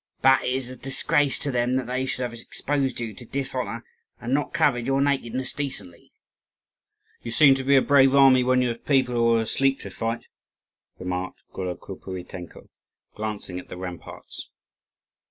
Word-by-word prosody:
But 130 0 +5
it - - -1
is 130 -2 -2
a 130 - -6
disgrace 135 +2 +2
to 140 - -2
them 125 0 +1
that 130 -1 0
they 130 +2 -2
should 130 - -2
have 120 -1 -4
exposed 135 +3 -2
you 115 -2 -4
to 125 - -10
dishonour, 125 -4 -4 0.4
and 120 +2 -3
not 145 0 0
covered 120 0 +1
your 135 0 +2
nakedness 130 -2 0
decently." 130 -11 -4 1.1
"You - - -6
seem 135 +4 +6
to 135 0 -2
be 140 +1 +4
a 135 - +5
brave 135 -1 +5
army 135 -2 +6
when 125 0 +3
you 125 - +1
have 115 0 -6
people 130 -3 +2
who 115 -1 +3
are 115 - +2
asleep 135 +4 +1
to - - -8
fight," 115 +1 -3 0.7
remarked 90 0 -4
Golokopuitenko, 90 -1 -7 0.5
glancing 105 -4 -4
at - - -12
the - - -7
ramparts. 90 -1 -8
125 Hz, 170 wpm, -25 LUFS, 115-135 Hz, 1.1 s, seem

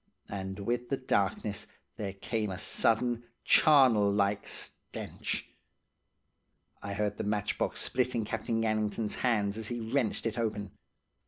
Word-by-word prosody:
And 95 -1 -4
with 120 +3 -1
the 135 - +1
darkness 100 -4 0 0.3
there 100 -3 -4
came 110 +2 -2
a 95 - -4
sudden 120 +4 +2 0.2
charnel 125 -9 +6
like 100 0 +1
stench. - - -3 1.3
"I 100 - -4
heard 105 0 -1
the - - -2
matchbox 105 0 0
split 125 -1 +1
in 115 -2 0
Captain 115 +1 -1
Gannington's 110 0 0
hands 105 -4 +1
as 110 - -3
he 120 +1 -3
wrenched 125 -6 0
it 115 +1 -1
open. 105 -4 -2
110 Hz, 135 wpm, -31 LUFS, 100-120 Hz, 1.3 s, charnel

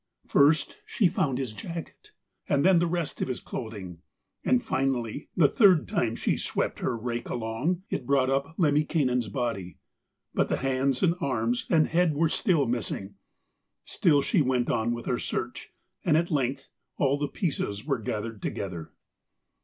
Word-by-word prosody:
First, 145 +2 +3
she 200 - +2
found 145 -7 0
his 130 -5 -3
jacket, 165 +8 -8 0.4
and 140 +2 +2
then 185 -2 +6
the 175 - +2
rest 170 -2 -3
of - - 0
his 130 -2 -3
clothing; 100 -8 -7 0.4
and 125 -1 +2
finally, 130 0 -1
the 160 -5 +6
third 185 - +5
time 115 -1 0
she - - 0
swept - - -2
her 120 - -1
rake 120 +1 -4
along, 120 +11 -2
it 125 - -3
brought 135 -2 +3
up 140 +4 -1
Lemminkainen's 145 - +2
body, 100 -7 -3 0.6
but - - +1
the - - +1
hands 135 0 0
and 170 -2 +4
arms 120 -3 0
and 160 -3 +4
head 165 -2 +2
were 160 +2 +2
still 165 - +2
missing. 115 -4 -3 0.7
Still 145 -5 +3
she 190 - +2
went 130 -3 +1
on 115 0 0
with 120 0 -4
her - - 0
search, - - -4 0.3
and 155 -3 +3
at 170 +1 0
length 135 -2 -1 0.3
all 140 0 +2
the 145 - 0
pieces 110 - -3
were 135 -5 0
gathered 110 0 -4
together. 90 -5 -5
135 Hz, 160 wpm, -27 LUFS, 120-155 Hz, 0.7 s, then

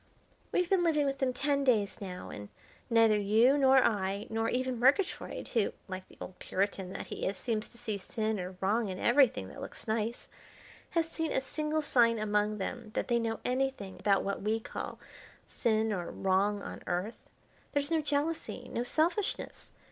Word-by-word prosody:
"We've 360 - +2
been 370 -1 +3
living 305 -4 +3
with 275 -1 -1
them 265 -2 +2
ten 280 +2 0
days 220 -5 +2
now, 180 -2 -6
and 105 0 -8 0.4
neither 225 -2 +5
you 220 +6 +5
nor 265 -2 +6
I, 200 -1 0
nor 225 0 0
even 255 -1 -1
Murgatroyd, 280 - +1
who, 225 -5 +1
like 185 -1 -6
the - - -18
old 185 - -8
Puritan 190 -1 -1
that - - -5
he - - -3
is, 195 - -2
seems 220 -3 -2
to 235 - -18
see 215 -3 -3
sin 215 +2 -2
or 180 0 -6
wrong 210 +3 +1
in 185 - -4
everything 240 - +3
that - - -10
looks - - -8
nice, 220 +2 -1 0.6
has 330 -1 +1
seen 325 -1 -3
a - - +2
single 305 +3 -2
sign 230 -5 +4
among 210 0 +1
them 225 +3 -4
that - - -1
they 240 -1 +3
know 225 -1 -2
anything 255 -6 -1
about 200 -2 +3
what 200 - -2
we 215 +2 +1
call 225 - -6 0.5
sin 220 -2 +1
or 175 -3 -3
wrong 200 +2 +1
on - - -7
Earth. 180 +6 -3 0.4
There's 285 +1 0
no 325 -1 +3
jealousy, 290 -3 -2
no 235 - -2
selfishness. 330 - -1
230 Hz, 180 wpm, -31 LUFS, 205-270 Hz, 0.6 s, nor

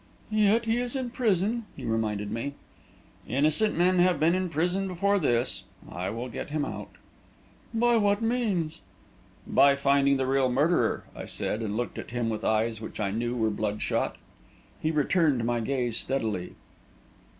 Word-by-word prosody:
"Yet 215 +2 +3
he 225 +1 +1
is 245 +1 -2
in 255 -3 -2
prison," 220 -1 0
he 130 - -7
reminded 105 -2 -1
me. 140 +5 -3 0.7
"Innocent 155 - +2
men 180 +1 +3
have 180 0 +4
been 165 +2 +4
in 185 0 0
prison 180 +5 0
before 200 +3 +1
this. 120 -7 0 0.3
I 90 +2 -3
will 115 +4 -4
get 125 - -6
him 150 -1 -1
out." - - -6 0.8
"By 240 +1 +3
what 205 -1 +3
means?" 225 -9 -1 0.6
"By 140 0 +5
finding 140 0 +3
the 135 - 0
real 135 0 +2
murderer!" 150 +8 +2
I - - -6
said, 110 - -3
and 105 -1 -2
looked 120 - -3
at - - -7
him 120 -1 -1
with 110 - -4
eyes 110 0 +1
which 110 - -7
I 100 -2 0
know 120 +3 -2
were 110 -2 +1
bloodshot. 105 0 -1 0.7
He 155 - +1
returned 150 -4 +2
my 120 0 +1
gaze 120 -1 -1
steadily. 110 -9 -2
140 Hz, 160 wpm, -27 LUFS, 115-190 Hz, 0.8 s, By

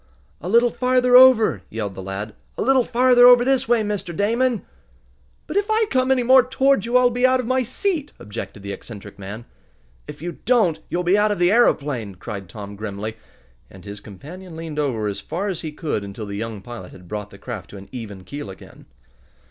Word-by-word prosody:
"A 175 - -5
little 235 +3 +4
farther 250 0 +2
over!" 250 - +7
yelled 105 -3 -4
the 95 - -8
lad. 95 +3 -6 0.2
"A - - -1
little 265 +1 +4
farther 245 0 +5
over 245 0 +7
this 265 -2 +2
way, 235 -2 +3
Mr. 200 -5 -4
Damon!" 230 +2 +1 0.8
"But 320 - -3
if 405 0 +1
I 440 +1 +3
come 255 0 +2
any 260 -2 +3
more 260 +2 +7
toward 265 -3 +2
you 240 +2 +3
I'll 250 -1 +4
be 245 +1 -2
out 255 0 +2
of 250 - -2
my 260 +2 +1
seat!" 295 - -2
objected 105 -1 -8
the 100 - -5
eccentric 105 -1 -10
man. 100 +4 -8 0.6
"If - - -9
you 175 +3 -6
don't 220 -10 +2
you'll 180 - -1
be 185 +4 +3
out 210 +1 +3
of 205 - -1
the 175 +1 +3
aeroplane!" 140 - +1
cried 100 -1 -7
Tom 100 +2 -8
grimly, 105 +1 -5 0.5
and 95 0 -15
his 100 0 -8
companion 160 - -11
leaned 160 -2 -6
over 125 -7 -1
as 100 -1 -3
far 195 +5 -4
as 180 -4 -3
he 155 - -5
could 150 -8 -3
until 100 +2 -7
the 100 -1 -6
young 110 -1 -5
pilot 115 -6 -9
had 90 -1 -14
brought 105 +1 -5
the 100 - -14
craft 105 -6 -7
to 100 - -10
an 95 - -11
even 105 -7 -8
keel 140 +4 -7
again. 95 - -13
165 Hz, 210 wpm, -22 LUFS, -, 0.8 s, over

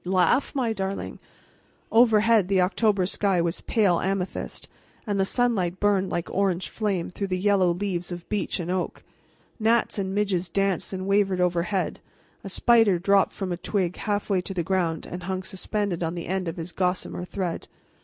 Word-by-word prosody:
"Laugh, 185 +11 +2
my 240 -5 +1
darling!" 195 -1 -4 0.7
Overhead 225 -3 +5
the 195 -1 +2
October 195 +1 +2
sky 195 -1 +1
was 170 +1 -1
pale 200 -7 +2
amethyst, 190 -1 -3 0.4
and 205 -3 -1
the 195 - +3
sunlight 195 -6 +1
burned 200 -2 +2
like 170 0 -2
orange 185 -4 0
flame 200 -6 -2
through 200 +2 -3
the 185 -1 -1
yellow 195 -1 +3
leaves 180 -1 -3
of 175 0 -7
beech 205 -2 -1
and 175 0 -3
oak. 185 -1 -3 0.6
Gnats 225 -1 +2
and 190 0 -2
midges 190 -4 0
danced 195 0 0
and 185 -1 -4
wavered 195 -1 +2
overhead; 180 +2 0 0.4
a 195 - -6
spider 225 -2 +4
dropped 195 +2 +3
from 190 -2 -4
a 175 - -2
twig 180 -1 -1
halfway 205 -2 0
to 195 +2 -7
the 175 - 0
ground 170 -3 -1
and 180 - -7
hung 185 +1 -3
suspended 190 -1 -3
on 165 0 -2
the 170 - -5
end 190 -1 -2
of 165 - -4
his 170 +1 -5
gossamer 180 0 -2
thread. 180 -2 -4
190 Hz, 175 wpm, -25 LUFS, 180-205 Hz, 0.7 s, Overhead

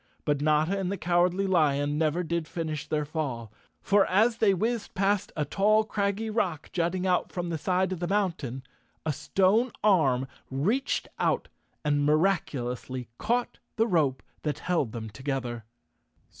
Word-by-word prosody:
But 145 -2 +1
Notta 155 +6 +2
and 190 -1 -1
the 200 - -2
Cowardly 175 +2 +2
Lion 145 -5 +2
never 160 +2 +1
did 170 -1 -2
finish 155 -3 -4
their 150 -1 0
fall—for 145 - -1
as 225 +5 +3
they 215 -3 +4
whizzed 220 +4 -1
past 200 +1 +1
a 150 - 0
tall, 210 +7 +3
craggy 205 0 -1
rock, 185 -8 -1
jutting 180 +2 0
out 180 -1 +1
from 175 -1 -3
the 165 - -1
side 185 +3 +1
of 180 -2 -4
a 175 - -1
mountain, 165 - -1 0.4
a 155 - +1
stone 195 - +2
arm 140 -11 +3 0.2
reached 200 - 0
out - - +1 0.4
and 145 -1 +2
miraculously 135 -7 0
caught 240 +3 -1 0.2
the 225 - +3
rope 155 - +1 0.2
that 150 -1 -2
held 165 -10 0
them 110 -1 -5
together. 125 -1 -4
170 Hz, 150 wpm, -28 LUFS, 145-195 Hz, 0.4 s, they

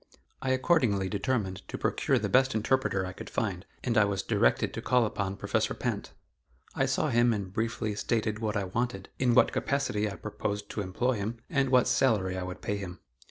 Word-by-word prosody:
I 130 - -2
accordingly 125 - +2
determined 100 -2 -1
to - - -5
procure - - +1
the - - -1
best 130 -1 +3
interpreter 110 -3 +1
I 90 - -6
could - - -9
find 100 -4 -2 0.2
and 120 -3 +2
I 105 - +5
was 100 -2 -1
directed - - +2
to - - -4
call 125 -2 +3
upon 100 -2 -2
Professor - - -1
Pinte. - - -3 0.6
I - - +1
saw - - +1
him 120 +1 +4
and 100 -3 -4
briefly 110 -1 -1
stated 110 0 -1
what 110 -2 -1
I 100 - 0
wanted, 120 +7 -3
in 125 -2 +3
what 125 - +5
capacity 105 -7 0
I 100 - -6
proposed 105 -1 -4
to 105 - -3
employ 115 +6 0
him, 105 +4 -3
and 140 -4 +2
what 125 -1 +4
salary 100 -8 +2
I 95 - -3
would 90 0 -6
pay 105 - -1
him. 90 -3 -7
105 Hz, 200 wpm, -29 LUFS, 100-125 Hz, 0.6 s, I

